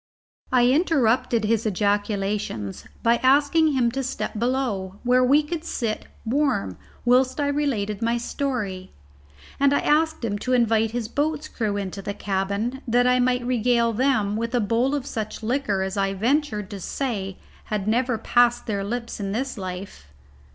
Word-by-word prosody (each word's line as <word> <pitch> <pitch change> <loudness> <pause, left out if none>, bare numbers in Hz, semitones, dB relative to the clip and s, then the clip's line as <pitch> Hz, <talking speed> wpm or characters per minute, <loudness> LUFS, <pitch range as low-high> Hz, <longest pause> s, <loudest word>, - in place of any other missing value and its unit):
I 250 -1 +4
interrupted 255 -6 +2
his 225 0 +1
ejaculations 205 - -1 0.2
by 235 +1 +4
asking 285 +5 +3
him 245 -3 +2
to 270 +3 -2
step 250 -4 -4
below, 230 -7 -1
where 250 +1 +4
we 285 +4 +4
could 315 +1 -4
sit 230 -9 -3 0.2
warm 240 - 0 0.3
whilst 255 +3 +3
I 290 - +1
related 235 -9 -1
my 230 +1 +1
story, 230 -7 -3 0.7
and 280 0 +4
I - - +3
asked 315 -3 +1
him 205 -2 -2
to 255 - -1
invite 225 -2 +3
his 230 0 -3
boat's 300 +3 -1
crew 215 -7 -2
into 195 0 -4
the 200 +1 -5
cabin 200 +6 -2
that 245 +1 +3
I 250 0 +4
might 250 0 +1
regale 235 -1 +2
them 220 -4 +1
with 230 +2 -2
a - - +3
bowl 235 +6 +1
of 280 -3 -3
such 220 -3 -5
liquor 220 -5 0
as 190 +1 -4
I 195 0 0
ventured 220 -2 0
to 200 - -6
say 195 -3 -3 0.3
had 210 -2 -3
never 245 +2 +1
passed 240 +2 +2
their 200 -3 -2
lips 235 +3 -4
in 195 -1 -3
this 260 +4 -2
life. 185 - -7
235 Hz, 165 wpm, -24 LUFS, 205-260 Hz, 0.7 s, I